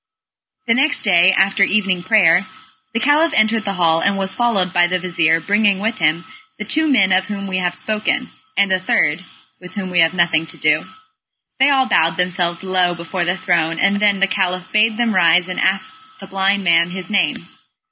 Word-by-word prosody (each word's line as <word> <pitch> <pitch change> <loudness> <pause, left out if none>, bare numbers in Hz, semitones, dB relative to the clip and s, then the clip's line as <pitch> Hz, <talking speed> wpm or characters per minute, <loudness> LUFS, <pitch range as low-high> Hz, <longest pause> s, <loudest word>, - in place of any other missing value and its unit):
The 230 - +2
next 280 +5 +1
day, 180 -2 +4
after 195 +1 +1
evening 195 -2 +1
prayer, 185 -2 +3 0.4
the 230 - -2
Caliph 300 +5 +2
entered 220 0 +1
the 200 - -2
hall, 165 -2 +1
and 200 0 0
was 190 -1 -1
followed 200 -7 -1
by 175 0 +3
the 185 +1 -1
vizir 165 -2 0
bringing 205 +3 +1
with 220 +2 -3
him 165 +1 0 0.3
the - - -7
two 315 0 0
men 195 -9 +2
of 185 0 +1
whom 200 -1 -6
we 185 -1 -3
have 180 -1 -2
spoken, 215 0 -3 0.3
and 200 -1 +2
a 185 - +1
third, 170 -2 0 0.4
with 180 +2 -14
whom 190 -3 -5
we 175 - 0
have 165 +2 +2
nothing 165 -2 0
to - - -13
do. 155 0 0 0.7
They 270 +2 +4
all 265 -2 +2
bowed 165 -8 +1
themselves 180 -1 -1
low 185 -2 0
before 175 +1 -4
the 175 +2 -1
throne 165 -3 -1
and 200 +3 +1
then 205 -1 +1
the - - +5
Caliph 185 -1 -3
bade 215 +1 +1
them 235 -2 0
rise, 175 -1 +3
and 185 - -5
ask 190 - 0 0.3
the - - -10
blind 195 +1 -1
man 170 -1 +2
his 185 +3 -6
name. 200 -2 -1
185 Hz, 200 wpm, -17 LUFS, 175-210 Hz, 0.7 s, the